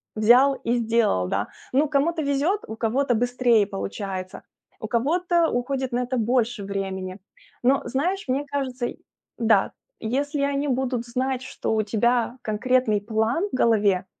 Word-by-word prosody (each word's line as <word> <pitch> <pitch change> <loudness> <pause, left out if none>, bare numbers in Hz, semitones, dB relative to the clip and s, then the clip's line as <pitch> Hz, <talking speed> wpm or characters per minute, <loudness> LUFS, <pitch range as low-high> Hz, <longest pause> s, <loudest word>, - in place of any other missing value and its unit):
взял 245 +6 +5
и 235 - +1
сделал, 225 - +1
да. 100 +3 -1 0.3
Ну, 290 +3 +3
кому-то 315 +3 +1
везет, 285 +9 +1
у 220 - -6
кого-то 245 +3 +1
быстрее 245 -2 +2
получается, 195 -1 -5 0.4
у - - -5
кого-то 335 +7 +1
уходит 260 +1 -2
на 245 - 0
это 255 +1 -2
больше 235 -1 0
времени. 190 -1 -4 0.4
Но, 265 +3 +3
знаешь, 360 +9 -1
мне 270 +3 0
кажется 265 -4 -3
й - - -9 0.4
да, 220 -4 +3 0.3
если 280 +6 -1
они 280 +1 0
будут 255 -2 -1
знать, 255 +1 -1
что 260 - -3
у 220 - +2
тебя 235 +3 +1
конкретный 220 0 +1
план 225 - 0
в - - -2
голове, 205 -6 +2
245 Hz, 150 wpm, -24 LUFS, 220-275 Hz, 0.4 s, взял